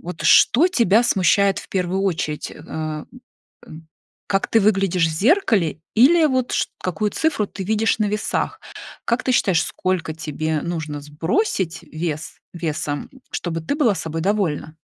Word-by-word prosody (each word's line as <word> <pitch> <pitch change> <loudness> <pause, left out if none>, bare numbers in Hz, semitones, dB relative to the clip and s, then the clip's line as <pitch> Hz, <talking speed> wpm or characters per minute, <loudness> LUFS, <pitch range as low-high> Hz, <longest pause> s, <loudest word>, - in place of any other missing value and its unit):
вот 175 -1 -8
что 290 +9 +6
тебя 230 - +3
смущает 200 -2 +3
в - - -10
1 185 0 -1
очередь? 160 -5 -2
Э, - - -11
м, 155 -1 -5 0.6
м, 160 +1 -12 0.4
как 195 -1 0
ты 225 - +3
выглядишь 195 -4 +2
в - - -3
зеркале 200 - +2 0.2
или 315 +8 +6
вот 260 -4 0
чт - - 0
какую 185 +4 -1
цифру 285 -10 0
ты 195 - -7
видишь 220 +3 +1
на 215 - +2
весах? 210 +1 -2 0.5
Как 235 +2 0
ты 255 - +1
считаешь, 190 -8 +3
сколько 185 -4 -2
тебе 155 0 -3
нужно 160 -4 -4
сбросить 165 - -1
вес 155 -1 -5
весом, 155 -4 -3 0.2
чтобы 165 -2 -3
ты 160 - -2
была 240 -10 +2
собой 165 -1 -4
довольна? 185 -6 0
185 Hz, 155 wpm, -21 LUFS, 160-215 Hz, 0.6 s, что